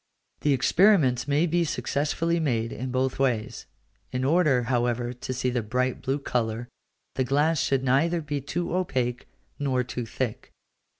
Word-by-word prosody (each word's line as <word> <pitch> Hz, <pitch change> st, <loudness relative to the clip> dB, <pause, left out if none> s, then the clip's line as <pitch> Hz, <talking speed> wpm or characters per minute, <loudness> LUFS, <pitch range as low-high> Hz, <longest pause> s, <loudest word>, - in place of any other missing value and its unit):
The 145 Hz, -, +2 dB
experiments 135 Hz, -, +4 dB
may 145 Hz, +4 st, +3 dB
be 175 Hz, +1 st, +1 dB
successfully 165 Hz, +2 st, -1 dB
made 115 Hz, -7 st, 0 dB
in 130 Hz, +1 st, -4 dB
both 130 Hz, +1 st, -1 dB
ways: 120 Hz, -5 st, -1 dB, 0.4 s
in 125 Hz, 0 st, -2 dB
order, 145 Hz, -4 st, +3 dB
however, 120 Hz, 0 st, 0 dB
to 125 Hz, +1 st, -6 dB
see 125 Hz, 0 st, -1 dB
the 120 Hz, -1 st, 0 dB
bright 125 Hz, +3 st, -1 dB
blue 135 Hz, +2 st, 0 dB
colour, 120 Hz, -4 st, -2 dB, 0.5 s
the 130 Hz, -, 0 dB
glass 145 Hz, +4 st, +2 dB
should 135 Hz, -1 st, +1 dB
neither 150 Hz, +7 st, +2 dB
be 145 Hz, -2 st, -3 dB
too 170 Hz, +6 st, -3 dB
opaque 125 Hz, -9 st, -1 dB, 0.3 s
nor 130 Hz, -3 st, +1 dB
too 120 Hz, -1 st, -5 dB
thick. 120 Hz, -1 st, -4 dB
130 Hz, 155 wpm, -26 LUFS, 125-150 Hz, 0.5 s, experiments